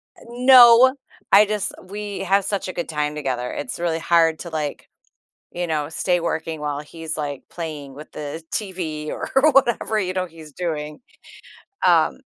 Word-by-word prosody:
Eh, -, -, -20 dB
no, 250 Hz, 0 st, +7 dB, 0.4 s
I 205 Hz, +2 st, +8 dB
just 210 Hz, -1 st, -2 dB
we 205 Hz, +2 st, -6 dB
have 195 Hz, +1 st, +1 dB
such 200 Hz, -2 st, -2 dB
a 185 Hz, -, -5 dB
good 175 Hz, -, -4 dB
time 150 Hz, -1 st, -2 dB
together, 125 Hz, -4 st, -3 dB
it's 145 Hz, -, -5 dB
really 170 Hz, -1 st, -1 dB
hard 165 Hz, -1 st, +3 dB
to, 175 Hz, -, -7 dB
like, 150 Hz, -3 st, -4 dB, 0.6 s
you 175 Hz, 0 st, -3 dB
know, 150 Hz, -3 st, -2 dB
stay 175 Hz, +2 st, 0 dB
working 160 Hz, -1 st, -3 dB
while 145 Hz, -1 st, -3 dB
he's, 160 Hz, +1 st, -7 dB
like, 145 Hz, -3 st, -4 dB
playing 150 Hz, -5 st, -7 dB
with 150 Hz, +3 st, -12 dB
the 150 Hz, +2 st, -6 dB
TV 170 Hz, -7 st, -4 dB
or -, -, -5 dB, 0.2 s
whatever, 240 Hz, -5 st, +2 dB
you 185 Hz, -3 st, -1 dB
know, 185 Hz, 0 st, -2 dB
he's 160 Hz, -3 st, -14 dB
doing. 150 Hz, -3 st, -4 dB, 0.9 s
Um -, -, +3 dB
165 Hz, 165 wpm, -22 LUFS, 150-195 Hz, 0.9 s, I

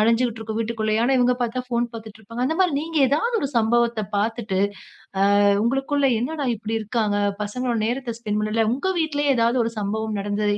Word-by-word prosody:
அலைஞ்சிட்டு 230 Hz, +1 st, +2 dB
இருக்கும் 220 Hz, 0 st, -4 dB
வீட்டுக்குள்ளயே. 220 Hz, -1 st, 0 dB
ஆனா 265 Hz, +2 st, +3 dB
இவங்க 250 Hz, 0 st, +3 dB
பாத்தா 245 Hz, +2 st, -2 dB
ஃபோன் 240 Hz, -1 st, 0 dB
பாத்துட்டுருப்பாங்க. 220 Hz, +1 st, -6 dB
அந்த 320 Hz, +3 st, -1 dB
மாரி 355 Hz, -6 st, +3 dB
நீங்க 320 Hz, 0 st, -2 dB
ஏதாவது 460 Hz, -, +1 dB
ஒரு 275 Hz, -, -1 dB
சம்பவத்தப் 230 Hz, -2 st, +1 dB
பாத்துட்டு 215 Hz, -3 st, -1 dB, 0.6 s
ஆ -, -, +5 dB, 0.4 s
உங்களுக்குள்ள 270 Hz, +3 st, +1 dB
என்னடா 280 Hz, +2 st, -2 dB
இப்படி 220 Hz, +1 st, -4 dB
இருக்காங்க, 215 Hz, -1 st, 0 dB, 0.3 s
பசங்களோட 240 Hz, +2 st, -2 dB
நேரத்த 240 Hz, -2 st, -3 dB
ஸ்பெண்ட் 210 Hz, -2 st, -2 dB
பண்ணல. 215 Hz, +1 st, +1 dB
உங்க 330 Hz, +9 st, -1 dB
வீட்லயே 290 Hz, -3 st, +1 dB
ஏதாவது 235 Hz, +2 st, +2 dB
ஒரு 230 Hz, -, -2 dB
சம்பவம் 215 Hz, +1 st, -2 dB
நடந்தது. 205 Hz, 0 st, 0 dB
230 Hz, 170 wpm, -23 LUFS, 215-255 Hz, 0.6 s, ஆ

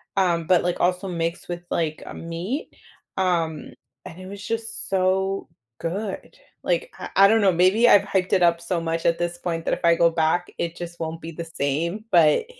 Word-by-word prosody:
um, 170 Hz, -4 st, +1 dB
but, 180 Hz, -1 st, +4 dB
like, 175 Hz, 0 st, -1 dB
also 180 Hz, +2 st, +1 dB
mixed 170 Hz, 0 st, -3 dB
with, 175 Hz, 0 st, -4 dB
like, 155 Hz, -2 st, -1 dB
a -, -, -7 dB
meat, 170 Hz, -, -5 dB, 0.4 s
um, 165 Hz, -4 st, -1 dB, 0.3 s
and 170 Hz, -, -10 dB
it 185 Hz, -, -9 dB
was 200 Hz, +1 st, -9 dB
just 225 Hz, 0 st, -4 dB
so 190 Hz, +1 st, 0 dB, 0.3 s
good, 190 Hz, +4 st, -4 dB, 0.3 s
like, -, -, -1 dB
I -, -, -7 dB
I 195 Hz, 0 st, +8 dB
don't 220 Hz, +1 st, +4 dB
know, 195 Hz, -2 st, +5 dB
maybe 185 Hz, +7 st, +4 dB
I've 205 Hz, -, +7 dB
hyped 190 Hz, -2 st, -1 dB
it 185 Hz, -, +4 dB
up 170 Hz, -1 st, +4 dB
so 170 Hz, -1 st, -2 dB
much 165 Hz, 0 st, -2 dB
at 170 Hz, -, +2 dB
this 175 Hz, 0 st, -2 dB
point 165 Hz, -2 st, -3 dB
that -, -, +1 dB
if -, -, -5 dB
I 170 Hz, -, +6 dB
go 170 Hz, 0 st, +4 dB
back, 165 Hz, +2 st, +1 dB
it 170 Hz, -1 st, -3 dB
just 170 Hz, 0 st, -8 dB
won't 165 Hz, 0 st, -4 dB
be 165 Hz, -, -7 dB
the 165 Hz, +1 st, -6 dB
same, 165 Hz, +7 st, -2 dB
but 165 Hz, -, +5 dB
175 Hz, 205 wpm, -23 LUFS, 165-195 Hz, 0.4 s, I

